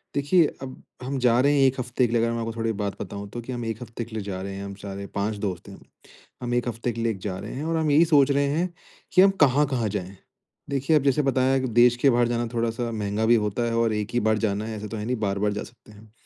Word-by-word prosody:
देखिए 150 +5 +4 0.2
अब 130 -1 -8 0.2
हम 135 +2 -3
जा 120 -1 +3
रहे 145 +2 +3
हैं 135 - +5
1 130 0 -1
हफ़्ते 125 0 0
के 115 - -5
लिए 115 - +3
अगर 115 - +1
मैं 115 - -2
आपको 115 0 -3
थोड़ी 115 0 -1
बात 100 -1 -3
बताऊँ 100 +1 -6
तो 120 - -6
कि 120 - -8
हम 120 -2 -4
1 115 0 -4
हफ़्ते 115 0 -6
के 115 - -11
लिए 110 - -3
जा 95 -2 -4
रहे 95 0 -5
हैं 100 - -6
हम 100 - -6
सारे 100 0 -6
5 105 +1 -1
दोस्त 95 0 -4
हैं 100 - -10
हम। - - -17 0.6
हम 120 0 -2
1 120 0 0
हफ़्ते 120 +1 -2
के 115 0 -5
लिए 115 0 +1
एक 105 - -5
जा 95 -1 -4
रहे 105 - -7
हैं 140 - -5
और 165 0 0
हम 155 -2 +1
यही 155 +4 +6
सोच 145 -4 +4
रहे 140 0 +2
हैं 170 +5 -1 0.4
कि 185 - +7
हम 195 - +7
कहाँ-कहाँ 135 -4 +2
जाएँ? 95 -1 -5 0.5
देखिए 140 +3 +1
अब 140 - 0
जैसे 140 +1 +3
बताया 135 0 +2
कि 130 - -2
देश 120 +1 +5
के 135 +3 +4
बाहर 120 -1 +3
जाना 120 0 -1
थोड़ा-सा 115 0 -1
महँगा 105 0 -1
भी 120 +1 +5
होता 105 +4 -1
है 115 0 -1
और 115 -1 +2
एक 105 -1 -2
ही 120 - +2
बार 110 -1 +2
जाना 105 -1 -1
है 110 0 -5
ऐसा 105 - -6
तो 110 - -6
है 105 - -4
नहीं 125 +2 0
बार-बार 100 0 0
जा 105 - -4
सकते 115 -2 -16
हैं। 105 +1 -17
115 Hz, 290 wpm, -25 LUFS, 105-130 Hz, 0.6 s, कि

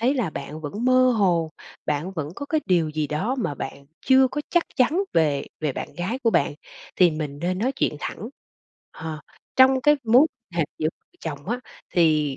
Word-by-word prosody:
thấy 250 +5 +2
là 235 - 0
bạn 150 +1 -7
vẫn 160 +10 -4
mơ 255 0 +5
hồ, 170 -5 +2 0.4
bạn 150 +6 -1
vẫn 155 -5 -3
có 285 - -6
cái 310 +1 +1
điều 175 -4 +3
gì 155 0 -1
đó 150 - -1
mà 180 - -1
bạn 140 0 -7 0.2
chưa 265 0 +6
có 295 - -3
chắc 345 -1 +3
chắn 300 +8 +3
về 150 -4 +2 0.2
về 150 -3 0
bạn - - -5
gái 190 +8 -2
của 235 -4 +2
bạn, 155 -7 +2 0.4
thì 180 -2 +6
mình 150 -2 -4
nên 180 +3 -1
nói 250 +6 0
chuyện - - 0
thẳng. 220 - -5 0.7
Hờ, 160 -1 -5 0.4
trong 260 0 +6
cái 295 +2 +5
mối 245 +7 +6 0.3
hệ 170 -2 +2
giữa 155 - +1 0.3
chồng 145 0 -6
á 240 +2 -1 0.3
thì 155 -5 +3
175 Hz, 195 wpm, -24 LUFS, 155-255 Hz, 0.7 s, chưa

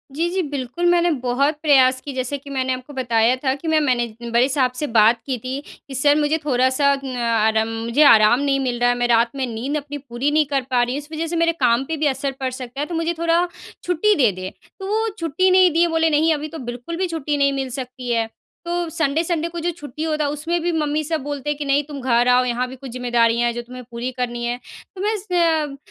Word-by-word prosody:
जी, 340 +2 0
जी 375 +1 -1
बिल्कुल 285 +2 -4
मैंने 350 0 +3
बहुत 275 +5 +1
प्रयास 260 -4 +4
कि 280 - -5
जैसे 260 +2 -3
कि 280 +1 -13
मैंने 260 -1 -1
आपको 255 +3 -8
बताया 240 -1 +2
था 260 -1 +2
कि 320 +3 -8
मैं 315 -1 +3
मैनेज 240 -5 0 0.2
बड़े 245 +3 +4
साहब 260 -2 +1
से 295 +3 -2
बात 225 +2 +5
की 260 -3 -2
थी 255 +4 -5 0.3
कि 270 - -7
सर 290 +3 +4
मुझे 300 +2 +1
थोड़ा-सा 260 +1 +2
उम, 270 -2 -5
आराम 220 -1 +2 0.2
मुझे 240 +6 +3
आराम 230 -2 +6
नहीं 275 -1 +1
मिल 245 -2 -2
रहा 245 0 +3
है 245 - +2
मैं 245 0 +1
रात 235 0 +3
में 265 -1 -1
नींद 270 +7 -2
अपनी 290 0 -6
पूरी 270 +1 -3
नहीं 305 0 +3
कर 275 -1 0
पा 245 -1 +3
रही 245 +2 -2
हूँ - - -2
इस 295 - -17
वजह 320 +1 -3
से 340 - -3
मेरे 335 - +3
काम 235 +2 +3
पे 320 +1 -3
भी 305 - -1
असर 275 0 -1
पड़ 260 -1 -2
सकता 255 +1 -7
है - - 0
तो 345 - -5
मुझे 330 +1 0
थोड़ा 335 +1 +2 0.4
छुट्टी 360 +4 +2
दे 245 -8 +3
दें। 185 - -5 0.3
तो 385 - -6
वो 440 +2 0
छुट्टी 335 +4 +1
नहीं 370 -2 +6
दिए 340 +2 +3
बोले 325 0 +2
नहीं 315 +2 +3
अभी 300 +1 -3
तो - - -8
बिल्कुल 250 +8 -7
भी 370 0 0
छुट्टी 300 -3 -2
नहीं 280 0 +2
मिल 270 -1 -3
सकती 250 -1 -6
है। 225 -1 0 0.4
तो 345 -1 -2
सन्डे-सन्डे 325 +2 0
को 340 0 -6
जो 345 +2 -1
छुट्टी 295 +1 -7
होता 310 -1 0
है - - 0
उसमें 330 +4 -2
भी 350 +1 0
मम्मी 305 -1 0
सब 315 -1 -2
बोलते 290 0 -4
हैं 295 - -1
कि 295 - -4
नहीं 280 +1 +2
तुम 285 -2 -8
घर 245 -1 +2
आओ 250 0 +5
यहाँ 250 +1 -1
भी 260 - -9
कुछ 260 -1 -10
ज़िम्मेदारियाँ 240 -1 +1
है 235 - -1
जो 240 - -4
तुम्हें 250 +1 -10
पूरी 240 +2 -4
करनी 240 -1 -3
है। 240 +1 -2 0.4
तो 375 - -7
बस 420 -1 -1
अ, - - +1
मैं 315 -5 +1
275 Hz, 255 wpm, -21 LUFS, 250-315 Hz, 0.4 s, आराम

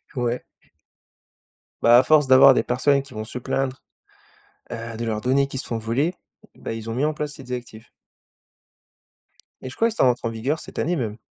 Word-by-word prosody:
Ouais. 125 0 -1 1.4
Bah, 120 +1 +7
à 125 - +6
force 150 0 +4
d'avoir 130 +1 +8
des - - +1
personnes 140 +3 +2
qui 140 -1 -15
vont 110 -1 -5
se 125 - -7
plaindre. 135 +2 -2 0.9
Heu, 115 0 -6
de 115 - -3
leurs 110 -2 -2
données 135 +4 +2
qui 135 - -7
se - - -6
font 115 - -2
voler, 125 +10 -1 0.4
bah, - - -6
ils 115 0 -7
ont 115 - -3
mis 135 +4 +1
en 155 - 0
place 150 -1 -4
ces 135 - -11
directifs 120 -3 -8 1.7
et 130 - -6
je - - -11
crois 230 - +2
que 225 - -7
ça - - +2
rentre 125 -1 +2
en - - +1
vigueur 120 +8 -2
cette - - -9
année 175 +3 0
même. 115 -7 -3
125 Hz, 200 wpm, -23 LUFS, 115-140 Hz, 1.7 s, d'avoir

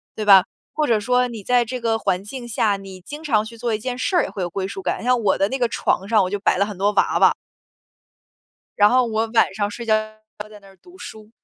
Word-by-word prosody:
对 215 - -4
吧？ 195 -2 +7 0.3
或 305 -1 0
者 225 -3 +2
说 250 +3 +1
你 230 -4 -8
在 245 +2 +2
这 250 +2 -5
个 225 -1 0
环 190 -2 -1
境 240 +3 -8
下， 210 -2 0
你 190 -1 -11
经 295 - -9
常 220 -8 +1
去 230 +1 -11
做 235 -1 -2
一 215 - -2
件 245 +2 -4
事 365 +9 -1
儿， 350 - +4
也 - - -4
会 195 - -7
有 175 - -2
归 190 +2 -4
属 195 - -7
感。 - - -2
你 - - -9
像 250 0 +3
我 200 -3 +1
的 195 - +1
那 265 - -2
个 240 - +2
床 195 -4 -1
上 215 -2 +3
我 185 - -2
就 205 +1 -3
摆 200 - +1
了 200 - +2
很 205 -2 -8
多 200 +2 +1
娃 - - +2
娃。 - - +5 1.4
然 205 0 +6
后 255 +1 +3
我 225 0 -1
晚 225 - +3
上 205 0 -2
睡 235 +3 -8
觉 220 - +2
要 215 - 0
在 - - -27 0.2
那 210 - -5 0.3
儿 - - -30
读 360 0 -17
书。 215 -7 -11
220 Hz, 295 characters per minute, -21 LUFS, 200-245 Hz, 1.4 s, 吧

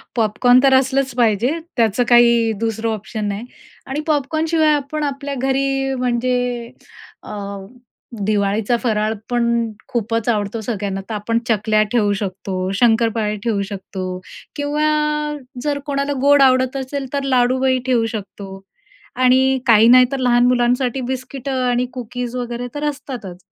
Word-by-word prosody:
Popcorn 245 +2 +4
तर 270 -1 +5
असलंच 265 0 +1
पाहिजे, 235 0 +2 0.3
त्याचं 230 0 +2
काही 235 -1 +5
दुसरं 225 0 -1
ऑप्शन 215 0 -5
नाही 205 +3 -4 0.4
आणि 270 +3 -3
पॉपकॉर्नशिवाय 315 +2 +1
आपण 295 +2 -3
आपल्या 280 0 -3
घरी, 270 +1 0
म्हणजे 245 -1 -1 0.5
अ, - - -9 0.9
दिवाळीचा 205 +2 +1
फराळ 215 -2 0 0.2
पण 240 -1 +1 0.4
खूपच 230 -2 -2
आवडतो 215 0 -1
सगळ्यांना, 200 -3 -3
तर - - -3
आपण 230 +3 -1
चकल्या 215 0 +2
ठेवू 210 -4 +2
शकतो, 190 -1 -3
शंकरपाळे 225 -1 +2
ठेवू 220 -4 0
शकतो 190 -1 -6 0.5
किंवा 295 +1 0 0.8
जर 290 -1 -1
कोणाला 280 0 -1
गोड 285 +1 +5
आवडत 260 0 +3
असेल 270 +1 -4
तर 280 -1 -1
लाडूही 260 0 +2
ठेवू 245 -3 +2
शकतो. 195 -3 -7 0.6
आणि 260 +1 +4
काही 225 -1 +6
नाही 250 +1 +8
तर 275 - -1
लहान 245 -1 +3
मुलांसाठी 250 +1 +1
बिस्किटं 260 +1 -4
आणि 245 0 +1
कुकीज 245 0 -5
वगैरे 245 0 -4
तर 295 - -4
असतातच. 255 -11 -7
245 Hz, 135 wpm, -19 LUFS, 220-265 Hz, 0.9 s, नाही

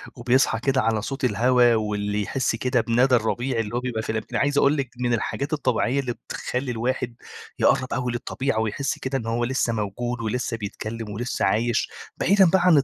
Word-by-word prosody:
وبيصحى 120 -2 +2
كده 130 +1 +1
على 110 -2 +1
صوت 135 +3 -5
الهوا 120 +1 +4
واللي 105 -1 -1
يحس 130 +2 -1
كده 125 0 +1
بندى 125 +3 +3
الربيع 120 +2 0
اللي 115 +1 -3
هو 120 - +1
بيبقى 125 -3 -3
في 110 - -3
الم 110 -1 -2
عايز 145 0 +1
أقول 145 +1 +4
لِك 135 -3 -2
من 120 -1 +1
الحاجات 140 +6 -2
الطبيعية 130 -2 +1
اللي 125 -3 -2
بتخلّي 125 +2 -4
الواحد 120 +1 -2 0.4
يقرّب 130 - +2
أوي 125 -1 -1
للطبيعة، 120 0 -2
ويحس 110 +5 -2
كده 135 +1 -2
إن 115 - -5
هو 120 +1 0
لسّه 125 -2 0
موجود، 115 +3 -3
ولسّه 115 +1 -2
بيتكلّم، 110 +1 -5
ولسّه 115 -1 -2
عايش 115 +4 +1 0.3
بعيدًا 195 +1 +5
بقى 190 +1 +3
عن 175 -5 +6
ال 140 - +4
120 Hz, 190 wpm, -24 LUFS, 110-130 Hz, 0.4 s, عن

